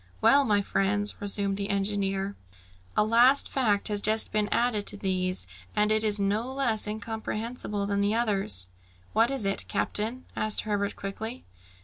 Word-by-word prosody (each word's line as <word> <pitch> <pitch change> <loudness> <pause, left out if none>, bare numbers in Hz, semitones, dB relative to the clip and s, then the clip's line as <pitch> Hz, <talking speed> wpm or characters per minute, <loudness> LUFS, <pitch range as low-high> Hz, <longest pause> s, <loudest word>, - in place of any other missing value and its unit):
"Well, 280 - +5
my 205 -3 +2
friends," 205 +2 0
resumed 200 -1 0
the 200 0 -3
engineer, 195 0 -1 0.6
"a - - +5
last 240 +5 +4
fact 215 -7 +1
has 205 -2 0
just 220 +1 +2
been 210 -1 0
added 230 -4 +1
to - - -1
these, 185 - -1 0.3
and 210 +1 +2
it 215 0 +2
is 210 -1 +2
no 210 +5 0
less 240 -6 0
incomprehensible 220 0 -4
than 200 0 0
the 205 +2 +1
others!" 195 - +1 0.4
"What 225 +2 +3
is 270 -6 +1
it, 195 - 0
captain?" 230 +5 -1
asked 215 -1 +1
Herbert 205 -1 -2
quickly. 220 +5 -6
210 Hz, 155 wpm, -27 LUFS, 200-225 Hz, 0.6 s, Well